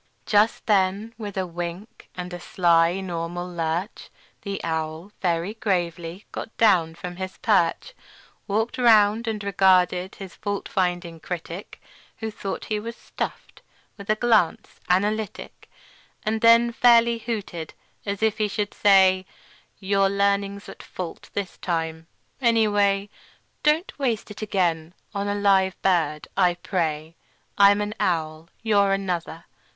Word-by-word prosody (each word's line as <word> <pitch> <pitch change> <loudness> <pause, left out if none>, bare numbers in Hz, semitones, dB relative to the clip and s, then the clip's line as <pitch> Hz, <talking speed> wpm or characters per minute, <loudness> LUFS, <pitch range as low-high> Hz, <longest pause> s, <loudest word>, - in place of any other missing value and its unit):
Just 210 +1 +2
then, 200 +2 +1
with 205 -3 -6
a 190 - 0
wink 175 +4 -7
and 180 0 -6
a 175 - -5
sly 170 0 +2
normal 175 -1 -4
lurch, 170 +3 -3 0.3
The 200 -1 -4
owl, 160 +3 -3
very 175 +2 0
gravely, 175 -4 -2
got 220 - -7
down 175 -7 +3
from 175 +1 -7
his 190 0 -6
perch, 195 - +1 0.5
Walked 220 +5 -1
round, 225 -1 +5
and 215 -2 -2
regarded 185 -1 +3
his 190 -3 -9
fault 205 -1 -4
finding 175 -3 -1
critic 175 +2 -7 0.4
(Who 220 -1 -4
thought 195 -2 -5
he 215 -1 -1
was 230 +2 -6
stuffed) - - -6 0.3
with 200 -1 -12
a 215 - +4
glance 215 -7 +1
analytic, 210 +3 -1 0.5
And 220 +1 -1
then 230 +1 +6
fairly 235 -1 +4
hooted, 205 -8 -5 0.3
as 200 +1 -3
if 220 0 +1
he 215 - +2
should 205 0 -3
say: 190 -2 +4 0.5
"Your 195 0 +2
learning's 200 0 0
at - - -10
fault 180 -3 -8
this 200 -2 -4
time, 160 -2 -3 0.3
any 230 -3 +4
way; 200 0 +1 0.5
Don't 305 +5 +2
waste 235 -6 -1
it 210 - -9
again 175 -5 -1 0.2
on 200 0 -2
a 205 - 0
live 195 -2 +2
bird, 160 -5 +1
I 180 -2 +3
pray. 165 -3 -3 0.4
I'm 200 0 +6
an 210 0 -3
owl; 160 -1 -1
you're 200 -3 +3
another. 180 -4 -3
195 Hz, 135 wpm, -24 LUFS, 175-210 Hz, 0.5 s, then